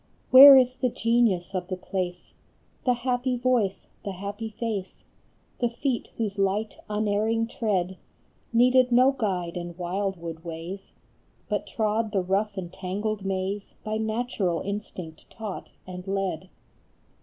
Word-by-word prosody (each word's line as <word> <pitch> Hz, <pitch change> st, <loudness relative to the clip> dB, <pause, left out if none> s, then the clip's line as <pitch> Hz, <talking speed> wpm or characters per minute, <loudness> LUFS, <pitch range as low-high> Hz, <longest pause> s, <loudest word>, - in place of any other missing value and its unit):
Where 270 Hz, +1 st, +12 dB
is 255 Hz, 0 st, +3 dB
the 255 Hz, -, +1 dB
genius 230 Hz, -7 st, +1 dB
of 180 Hz, -2 st, -2 dB
the 185 Hz, -1 st, -3 dB
place, 180 Hz, -1 st, -4 dB, 0.5 s
The 250 Hz, -1 st, +3 dB
happy 250 Hz, 0 st, +1 dB
voice, 235 Hz, -6 st, 0 dB, 0.2 s
the 200 Hz, -, -4 dB
happy 200 Hz, +4 st, -5 dB
face, 210 Hz, -3 st, -5 dB, 0.5 s
The 240 Hz, -, +2 dB
feet 240 Hz, +1 st, -2 dB
whose 205 Hz, -3 st, -2 dB
light, 200 Hz, +3 st, 0 dB
unerring 215 Hz, +2 st, +1 dB
tread 195 Hz, -6 st, -1 dB, 0.5 s
Needed 250 Hz, +1 st, +4 dB
no 255 Hz, +3 st, +6 dB
guide 185 Hz, -9 st, -2 dB
in 175 Hz, -1 st, -6 dB
wildwood 175 Hz, -3 st, -3 dB
ways, 170 Hz, +4 st, -7 dB, 0.6 s
But -, -, -1 dB
trod 220 Hz, -2 st, -1 dB
the 190 Hz, -2 st, +1 dB
rough 200 Hz, +3 st, 0 dB
and 175 Hz, -2 st, -5 dB
tangled 205 Hz, +2 st, -3 dB
maze 195 Hz, +1 st, -3 dB
By 215 Hz, 0 st, -2 dB
natural 220 Hz, -6 st, -1 dB
instinct 190 Hz, -5 st, -6 dB
taught 215 Hz, -4 st, -7 dB, 0.2 s
and 180 Hz, 0 st, -8 dB
led? 195 Hz, -1 st, -2 dB
205 Hz, 130 wpm, -26 LUFS, 185-230 Hz, 0.6 s, Where